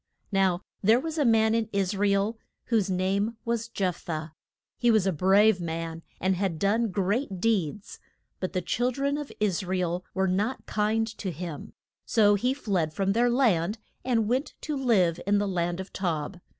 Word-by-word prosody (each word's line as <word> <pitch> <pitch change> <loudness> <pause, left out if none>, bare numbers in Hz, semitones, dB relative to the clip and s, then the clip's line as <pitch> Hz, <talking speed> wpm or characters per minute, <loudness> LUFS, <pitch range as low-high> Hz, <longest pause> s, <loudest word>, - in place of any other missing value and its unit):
Now 190 -2 +2 0.2
there 220 +4 +5
was 320 +2 -4
a 290 - +3
man 220 -1 +4
in 225 -1 0
Is 200 0 0
ra 205 +1 +2
el 200 +3 +1 0.3
whose 220 -5 +2
name 195 +4 0
was 230 -1 -1
Jeph 185 -6 -1
thah. 160 -1 -4 0.5
He 240 - +3
was 220 -4 +4
a 190 - +2
brave 190 +4 +4
man, 165 0 -4 0.2
and 190 +1 +1
had 185 -3 -1
done 215 +6 +1
great 195 +2 -1
deeds, 200 -3 -1 0.4
but 185 - -3
the 185 - -1
chil 245 +7 0
dren 280 +3 -1
of 295 -1 -5
Is 205 -2 +1
ra 185 +1 -1
el 180 0 -1
were 190 0 +2
not 205 +8 -1
kind 215 +1 +1
to 195 - -3
him, 165 -3 -7 0.3
so 205 -2 +4
he 245 +6 +1
fled 190 - -1
from 195 0 +1
their 240 +3 +3
land, 220 -6 +2 0.3
and 230 -4 +1
went 255 +6 -1
to 305 - -3
live 200 -11 +2
in 205 0 +4
the 205 0 0
land 175 -1 -1
of 190 - -7
Tob. 175 -1 -2
200 Hz, 190 wpm, -27 LUFS, 180-225 Hz, 0.5 s, there